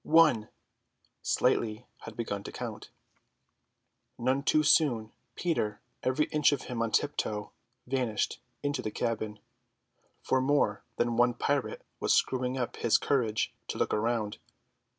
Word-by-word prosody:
"One!" 155 -10 +5 0.7
(Slightly 110 +1 +1 0.2
had 115 -1 -9
begun 100 -4 -2
to - - -6
count.) - - -6 1.3
None 130 +3 +1
too 155 +1 +3
soon, 125 -8 +3 0.2
Peter, 110 -12 -1 0.2
every 130 +4 +2
inch 150 -1 +4
of 145 - -1
him 120 -2 -4
on 115 - +1
tiptoe, 110 -5 -1 0.3
vanished 125 -5 -1 0.2
into 145 -2 0
the 110 - -3
cabin; 110 -2 -2 0.9
for 130 - +2
more 130 -6 +2
than 120 -1 0
one 120 0 +4
pirate 140 +1 -1 0.2
was - - +2
screwing 130 0 +1
up 125 -2 -3
his 115 - +4
courage 115 -6 0
to - - -4
look - - 0
round. 110 -1 0
120 Hz, 130 wpm, -30 LUFS, 110-140 Hz, 1.3 s, One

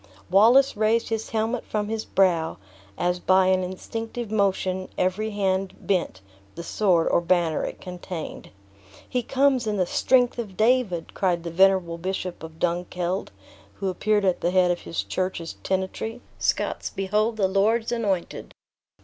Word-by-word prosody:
Wallace 240 +8 +6
raised 220 +2 +1
his 225 -1 -3
helmet 225 +2 -1
from 210 -1 -2
his 220 0 -3
brow, 170 -4 +2 0.4
as 180 +1 0
by 185 +1 +4
an 185 0 +3
instinctive 225 +5 -5
motion 190 -3 0
every 185 +4 0
hand 195 -2 -1
bent 175 - -1 0.3
the 170 - -6
sword 175 -3 +2
or - - +3
banner 170 -2 +1
it - - -6
contained. 180 -2 -7 0.6
"He 250 - -1
comes 265 -1 +2
in 210 -1 0
the 185 - +2
strength 245 +6 +2
of 200 -6 -6
David!" 220 -7 +1
cried 175 -3 0
the 170 - -5
venerable 185 -1 +3
bishop 185 0 -4
of 160 0 -10
Dunkeld, 175 +2 -2 0.5
who 195 - -2
appeared 205 +2 +1
at 185 -2 +1
the 175 - +1
head 180 -1 +3
of 175 - -1
his 165 - -3
church's 185 -3 -3
tenantry; 190 +5 -3 0.2
"Scots, - - -1
behold 210 +4 0
the 195 -3 +2
Lord's 220 +5 +1
anointed!" 205 -7 -2
190 Hz, 150 wpm, -25 LUFS, 180-220 Hz, 0.6 s, Wallace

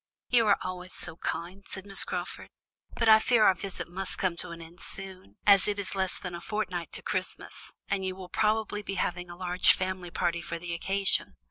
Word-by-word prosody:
"You 230 -3 +5
are 200 - +6
always 185 0 -5
so 160 -1 -6
kind," 180 +4 -4
said 190 0 -7
Miss 195 -1 +1
Crawford. 180 0 -4 0.5
"But 230 - +1
I 220 0 +9
fear 230 0 +4
our 190 - +7
visit 195 +1 -4
must 190 +2 -3
come 185 -3 +1
to - - -3
an 170 0 -7
end 165 +2 -12
soon, 190 - -8
as 200 -1 +7
it 205 -1 0
is 200 -2 -3
less 190 -1 0
than 180 -2 -6
a 170 - -5
fortnight 180 -6 -2
to - - -5
Christmas, - - -3 0.2
and 195 -1 0
you 185 0 -2
will 185 -1 -8
probably 215 +1 +1
be 195 -1 -4
having 180 -1 -1
a 175 - -8
large 180 0 +5
family 185 -1 -3
party 170 0 0
for 170 0 -4
the 170 0 -5
occasion." 190 - +1
185 Hz, 215 wpm, -29 LUFS, 175-200 Hz, 0.5 s, I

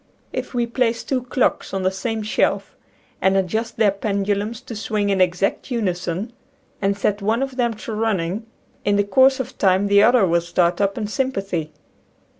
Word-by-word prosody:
If - - -4
we 240 -1 +2
place 235 -1 0
two 260 -2 -1
clocks 255 -5 0
on 190 - -1
the 185 - +2
same 220 +3 -3
shelf 215 - 0 0.5
and 190 0 +3
adjust 220 +5 -1
their 215 -3 +4
pendulums 200 +2 -1
to 230 - -8
swing 205 -1 -1
in 190 -1 +2
exact 180 +6 +1
unison 195 -2 -2 0.5
and 200 0 +1
set 205 +1 0
one 225 +5 +1
of 270 -1 -5
them 240 -3 0
to 215 +1 -7
running, 210 -1 -1 0.4
in 205 - +2
the 205 - +3
course 260 +7 +4
of 260 0 -5
time 190 0 +3
the 200 0 +5
other 235 -1 +5
will 170 -1 +2
start 175 +1 +1
up 200 0 +1
in 215 - -2
sym 265 +5 -1
pathy. 180 -7 -3
205 Hz, 185 wpm, -21 LUFS, 195-230 Hz, 0.5 s, the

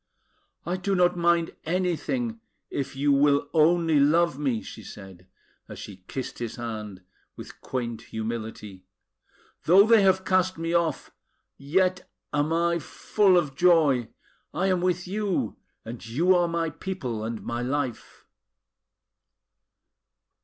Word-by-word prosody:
"I 175 +3 -2
do 195 +1 -1
not 180 -1 +3
mind 170 -1 +1
anything, 185 +8 -1 0.3
if 140 -1 -4
you 145 +1 +1
will 140 0 +3
only 165 -1 +4
love 150 0 +3
me!" 130 -7 -1
she - - -10
said, 95 -3 -12 0.4
as - - -9
she 100 - -9
kissed 130 -2 -6
his 120 -2 -4
hand 110 -5 -6 0.3
with - - -11
quaint 120 -3 -4
humility. 110 -3 -6 0.8
"Though 190 +5 +7
they 225 -1 +6
have 190 -1 +3
cast 185 -1 +1
me 165 +1 -3
off, 170 -4 0 0.4
yet 180 +6 0 0.2
am 145 +1 0
I 170 +1 +1
full 190 +5 +2
of 150 -6 0
joy! 150 -9 +3 0.5
I 190 - 0
am 185 -2 +1
with 180 0 0
you; 200 -1 -2 0.3
and 115 +1 -8
you 150 +12 +2
are 175 -1 +3
my 165 -1 -1
people 135 - -5
and 115 0 -5
my 120 +1 -3
life!" 130 -1 -4
160 Hz, 130 wpm, -26 LUFS, 120-180 Hz, 0.8 s, Though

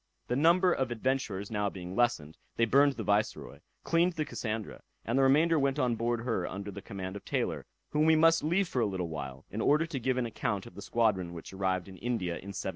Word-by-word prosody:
The 125 - +1
number 170 +5 +4
of 130 -1 -1
adventurers 115 -5 -2 0.2
being 90 -2 -7
now - - -6
lessened, 100 -11 +1 0.2
they 115 - +3
burned 140 +4 +4
the - - -5
Viceroy, 105 +1 -1 0.2
cleaned 170 +2 +2
the 155 -2 -2
Cassandra, 110 -7 -4 0.2
and 115 - -1
the 135 - +4
remainder 155 +5 +4
went 135 0 +1
on 125 -5 +1
board 115 +1 -1
her 115 -7 -1
under 100 +2 -6
the 100 - -8
command 95 -1 -6
of 100 - -8
Taylor, - - -2 0.2
whom 150 +1 +2
we 160 - +6
must 165 +1 +4
leave 175 +5 +2
for 125 - -1
a 110 - +2
little 90 -4 -3
while, 65 -4 -6
in 110 - -3
order 150 +6 +3
to 160 -5 -4
give 130 +1 0
an 125 - 0
account 105 -3 -2
of 120 - -12
the 100 - -9
squadron 100 -5 0
which 85 - -9
arrived 95 -1 -1
in 95 -1 -11
India 115 -7 -2
in 95 +3 -8
1721. - - -6
115 Hz, 230 wpm, -30 LUFS, 95-140 Hz, 0.2 s, we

